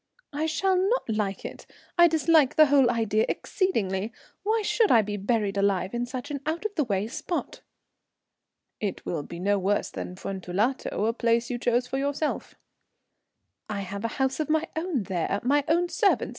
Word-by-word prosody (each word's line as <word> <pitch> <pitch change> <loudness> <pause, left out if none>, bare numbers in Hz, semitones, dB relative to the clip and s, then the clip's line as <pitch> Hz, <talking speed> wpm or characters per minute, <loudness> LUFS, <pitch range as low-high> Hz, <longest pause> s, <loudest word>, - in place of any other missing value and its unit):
"I 305 +2 -1
shall 380 +4 +1
not 400 +7 +1
like 210 -3 -2
it. - - -8 0.3
I 345 0 +7
dislike 320 -3 +3
the 310 - +8
whole 275 -3 +4
idea 220 -2 +1
exceedingly. 215 - -1 0.3
Why 435 +1 +1
should 445 +1 +2
I 225 -3 +6
be 205 0 -4
buried 205 0 0
alive 195 0 +1
in 240 0 -2
such 255 +3 -6
an 285 - -3
out 330 +6 -2
of 425 - -1
the 310 - +1
way 205 -4 -1
spot?" 335 +8 -4 1.2
"It 205 -3 -4
will 165 -4 -2
be 170 +4 -9
no 200 +2 +1
worse 200 +2 0
than 180 - -6
Fuentellato, 195 +5 -2
a 225 - +1
place 235 +1 +1
you 240 - -2
chose 245 +1 +1
for 265 +2 -3
yourself." 285 +2 -2 1.1
"I 205 -2 -2
have 200 +2 -6
a - - +1
house 265 +1 0
of 310 - -1
my 315 +1 +1
own 320 - -1
there 190 +1 -1
my 285 +3 +3
own 345 +2 +2
servants. 405 +2 +2
245 Hz, 180 wpm, -26 LUFS, 200-315 Hz, 1.2 s, the